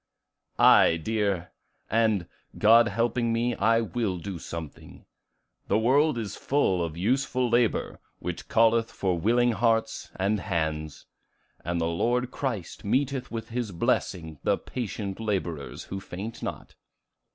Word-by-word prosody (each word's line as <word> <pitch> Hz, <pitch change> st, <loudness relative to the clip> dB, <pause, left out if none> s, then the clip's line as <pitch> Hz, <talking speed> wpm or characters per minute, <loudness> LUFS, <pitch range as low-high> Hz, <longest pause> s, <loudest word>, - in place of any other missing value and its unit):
"Aye, 85 Hz, -, +6 dB
dear; 100 Hz, -1 st, -1 dB, 0.4 s
and, 110 Hz, -5 st, +1 dB, 0.3 s
God 115 Hz, +2 st, +6 dB
helping 115 Hz, 0 st, 0 dB
me 120 Hz, +1 st, +1 dB
I 115 Hz, +2 st, +3 dB
will 110 Hz, -5 st, -2 dB
do 90 Hz, 0 st, -6 dB
something: 80 Hz, -2 st, -9 dB, 0.6 s
the 100 Hz, -, +2 dB
world 135 Hz, +5 st, +3 dB
is 110 Hz, -4 st, -4 dB
full 95 Hz, -11 st, +1 dB
of 80 Hz, -1 st, -5 dB
useful 130 Hz, +5 st, +1 dB
labor, 120 Hz, -1 st, +1 dB, 0.2 s
which -, -, -6 dB
calleth 115 Hz, 0 st, +3 dB
for 90 Hz, -3 st, -1 dB
willing 120 Hz, +6 st, +3 dB
hearts 115 Hz, +1 st, 0 dB
and 100 Hz, +2 st, 0 dB
hands. 80 Hz, -5 st, -3 dB, 0.6 s
And 85 Hz, 0 st, -1 dB
the 80 Hz, -, 0 dB
Lord 120 Hz, +9 st, 0 dB
Christ 115 Hz, -, -4 dB
meeteth 130 Hz, +4 st, 0 dB
with 115 Hz, -1 st, -6 dB
his 120 Hz, -3 st, -3 dB
blessing 80 Hz, -2 st, -1 dB
the -, -, +2 dB
patient 105 Hz, -5 st, -5 dB
laborers 90 Hz, -9 st, -3 dB
who 95 Hz, -, -6 dB
faint 100 Hz, +4 st, -7 dB
not." -, -, -6 dB
110 Hz, 130 wpm, -27 LUFS, 90-120 Hz, 0.6 s, Aye